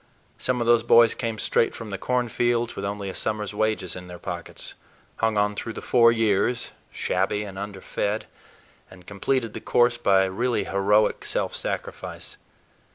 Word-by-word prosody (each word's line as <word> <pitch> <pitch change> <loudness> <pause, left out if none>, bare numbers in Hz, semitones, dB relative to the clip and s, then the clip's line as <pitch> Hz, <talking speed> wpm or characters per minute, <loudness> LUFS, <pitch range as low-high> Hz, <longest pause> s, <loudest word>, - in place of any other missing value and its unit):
Some 125 -1 0
of 120 - 0
those 120 0 +5
boys 115 0 +6
came 115 -3 -3
straight 115 - +1
from 115 -3 -7
the 100 - -3
cornfields 120 -1 0
with 100 - -4
only 100 0 -4
a 95 - -4
summer's 105 -1 -2
wages 110 -4 -1
in 90 -1 -9
their 90 0 -9
pockets, 85 0 -7 0.4
hung 110 -1 +1
on 105 0 +2
through 115 +2 -5
the - - -6
four 115 -1 +5
years, 115 +2 +1 0.2
shabby 95 +3 -1
and 100 -2 -8
underfed, 100 +1 -3 0.6
and 90 -1 -15
completed 115 +4 -1
the - - -6
course 120 0 +2
by 95 -4 +4
really 115 +6 0
heroic 100 +2 +2
self - - -1
sacrifice. - - -5
105 Hz, 160 wpm, -25 LUFS, 100-115 Hz, 0.6 s, boys